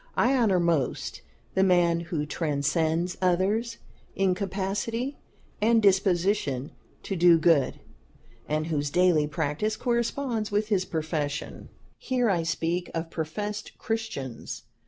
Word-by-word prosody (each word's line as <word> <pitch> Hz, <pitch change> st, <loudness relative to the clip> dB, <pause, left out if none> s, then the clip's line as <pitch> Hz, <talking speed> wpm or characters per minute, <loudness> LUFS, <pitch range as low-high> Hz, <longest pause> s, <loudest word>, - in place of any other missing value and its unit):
I 265 Hz, +3 st, +4 dB
honor 215 Hz, -8 st, +3 dB
most 165 Hz, -6 st, 0 dB, 0.3 s
the 190 Hz, -, +2 dB
man 175 Hz, -3 st, +4 dB
who 165 Hz, -3 st, -3 dB
transcends 160 Hz, +3 st, 0 dB
others 200 Hz, +6 st, +1 dB, 0.4 s
in 195 Hz, -1 st, +2 dB
capacity 200 Hz, +7 st, -3 dB, 0.4 s
and 230 Hz, +2 st, +4 dB
disposition 190 Hz, -, +2 dB, 0.3 s
to 195 Hz, -, -3 dB
do 175 Hz, -1 st, +6 dB
good, 160 Hz, -4 st, +3 dB, 0.7 s
and 155 Hz, +1 st, 0 dB
whose 145 Hz, -3 st, -1 dB
daily 175 Hz, -2 st, +3 dB
practice 160 Hz, +8 st, -1 dB
corresponds 235 Hz, -2 st, -1 dB
with 210 Hz, +1 st, 0 dB
his 190 Hz, -3 st, +1 dB
profession. 155 Hz, -3 st, -3 dB, 0.3 s
Here 245 Hz, -4 st, +1 dB
I 175 Hz, -3 st, +1 dB
speak 165 Hz, +2 st, -1 dB
of 165 Hz, 0 st, -3 dB
professed 205 Hz, +7 st, -4 dB
Christians. 220 Hz, -, -4 dB
180 Hz, 115 wpm, -27 LUFS, 160-210 Hz, 0.7 s, do